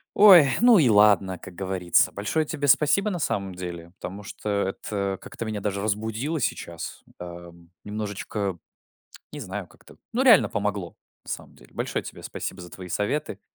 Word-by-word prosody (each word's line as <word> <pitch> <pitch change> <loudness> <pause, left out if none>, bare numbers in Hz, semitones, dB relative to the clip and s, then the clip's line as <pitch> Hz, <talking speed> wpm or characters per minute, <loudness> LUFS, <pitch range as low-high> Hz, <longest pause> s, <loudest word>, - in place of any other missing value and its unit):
Ой, 190 -7 +9 0.2
ну 240 -2 +7
и 145 -9 +5
ладно, 105 -3 +4
как 90 - -11
говорится. 95 -2 +2
Большое 105 +11 -1
тебе 145 -1 -3
спасибо, 155 +9 +4
на 185 - -2
самом 100 - -2
деле, 85 -2 -7
потому 95 +3 -7
что 105 - -9 0.2
это 100 0 -3
как-то - - -7
меня 110 -1 -3
даже 100 -1 -2
разбудило 110 +9 -2
сейчас, 85 - -4 0.2
эм, 85 -1 -10
немножечко, 105 -2 -4 0.7
не 150 - -7
знаю, 100 -4 -5
как-то. - - -19 0.2
Ну, 245 - +1
реально 240 -7 +7
помогло, 100 -4 -3 0.3
на - - -9
самом - - -7
деле. - - -19
Большое - - -2
тебе - - -9
спасибо 95 - -6
за 90 0 -10
твои 90 -2 -9
советы. 105 - -2
105 Hz, 165 wpm, -25 LUFS, 95-130 Hz, 0.7 s, Ой